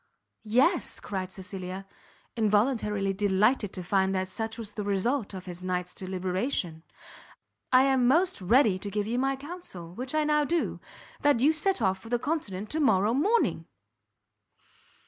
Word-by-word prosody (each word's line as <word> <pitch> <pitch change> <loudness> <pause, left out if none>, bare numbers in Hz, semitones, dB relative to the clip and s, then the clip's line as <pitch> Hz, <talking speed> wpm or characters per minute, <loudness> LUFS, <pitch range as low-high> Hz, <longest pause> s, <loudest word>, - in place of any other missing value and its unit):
"Yes," 280 - +2
cried 190 -2 -4
Cecilia, 190 0 -7 0.5
involuntarily 210 -2 +1
delighted 205 +2 +2
to 185 - -5
find 190 +1 +1
that 185 0 -1
such 220 +4 -4
was 220 -3 -7
the 210 - -5
result 205 +3 -1
of 185 - -7
his 180 -1 -7
night's 180 -1 -2
deliberation, 185 - -2 0.9
"I 255 0 +7
am 265 -2 +3
most 345 - +2
ready 215 0 +4
to 200 - -4
give 205 +1 -1
you 235 +3 -1
my 270 +1 +1
counsel; 270 - -9
which 255 +8 -5
I 310 - +3
now 300 0 +3
do, 335 +3 -1 0.4
that 290 -5 +4
you 290 +6 +4
set 315 - 0
off 190 -1 +1
for 225 - -12
the 240 - +2
Continent 230 - -3
to 315 - -1
morrow 215 -7 +3
morning." 405 - +1
210 Hz, 155 wpm, -28 LUFS, 190-270 Hz, 0.9 s, I